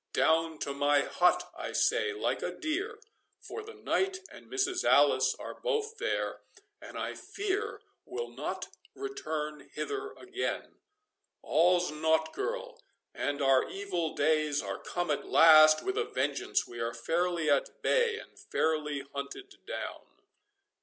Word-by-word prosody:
Down 160 0 +2
to 140 - -2
my 145 0 +3
hut, 180 +5 +2
I - - -5
say, 450 - +2
like 420 -1 -1
a - - -1
deer, 380 +8 -3 0.4
for 445 - -7
the 445 +1 -11
knight 380 0 0
and - - -13
Mrs. 380 -2 0
Alice - - +5
are - - -7
both 450 -2 -1
there, - - -1 0.4
and - - -9
I - - -3
fear 410 +2 -3 0.2
will 465 +5 -5
not - - -4 0.3
return 160 - -4
hither 415 -1 -3
again.—All's 380 - -2
naught, 160 +1 +1
girl—and 485 - -4
our 135 -1 +4
evil 185 -5 -3
days 155 -1 +2
are 100 -1 -4
come 175 -3 -2
at 145 - -2
last 155 -1 +8
with 385 +3 -1
a 455 - +1
vengeance—we 120 - -1
are 115 0 -2
fairly 170 +6 0
at 140 - +1
bay 475 -2 +3
and - - -12
fairly 150 -3 0
hunted 140 0 -6
down." - - -5
175 Hz, 135 wpm, -31 LUFS, -, 0.4 s, last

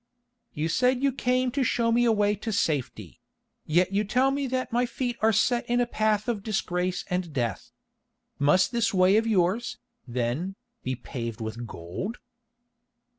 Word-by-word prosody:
"You 155 +2 -1
said 250 +7 +2
you 275 - +4
came 255 0 +1
to 275 +1 0
show 235 -1 +1
me 240 +1 +3
a 235 - +4
way 205 -1 +2
to 210 +2 -4
safety—yet 165 - -2
you 200 +2 +1
tell 255 +6 +2
me 280 0 -1
that 255 0 -2
my 245 +1 +1
feet 245 -1 -3
are 220 +1 +5
set 240 +3 +2
in 240 - +2
the 245 - +3
path 215 -2 0
of 230 -4 -1
disgrace 185 -2 -1
and 180 -2 -1
death. 120 -5 -3 0.7
Must 150 +6 +4
this 235 -4 +1
way 185 +2 +5
of 225 +1 +1
yours, 205 +2 +1 0.3
then, 125 +10 -2 0.3
be 130 - -2
paved 115 -3 -6
with 115 +1 -5
gold?" 95 - -6
210 Hz, 165 wpm, -27 LUFS, 165-240 Hz, 0.7 s, are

